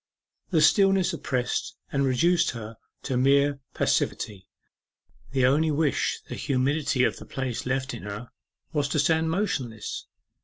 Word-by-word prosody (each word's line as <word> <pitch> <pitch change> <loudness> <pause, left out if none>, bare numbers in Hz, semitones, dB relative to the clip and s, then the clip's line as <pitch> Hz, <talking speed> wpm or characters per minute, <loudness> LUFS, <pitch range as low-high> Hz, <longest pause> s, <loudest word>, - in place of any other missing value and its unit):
The 165 -5 +3
stillness 195 +2 +4
oppressed 125 -6 -2 0.2
and 140 -1 +1
reduced 170 +8 +3
her 110 0 -8 0.3
to 130 -3 -1
mere 140 +2 +3 0.2
passivity. 95 -3 -1 0.8
The 130 -2 +2
only 150 +5 +3
wish 150 -1 0
the - - -6
humidity 140 0 +1
of - - +1
the - - -10
place 130 -2 -3
left 130 0 -1
in 120 - -7
her 105 +4 -7 0.4
was 145 -2 +1
to 145 +2 0
stand 160 +2 +2
motionless. 135 - -2
140 Hz, 140 wpm, -26 LUFS, 125-160 Hz, 0.8 s, stillness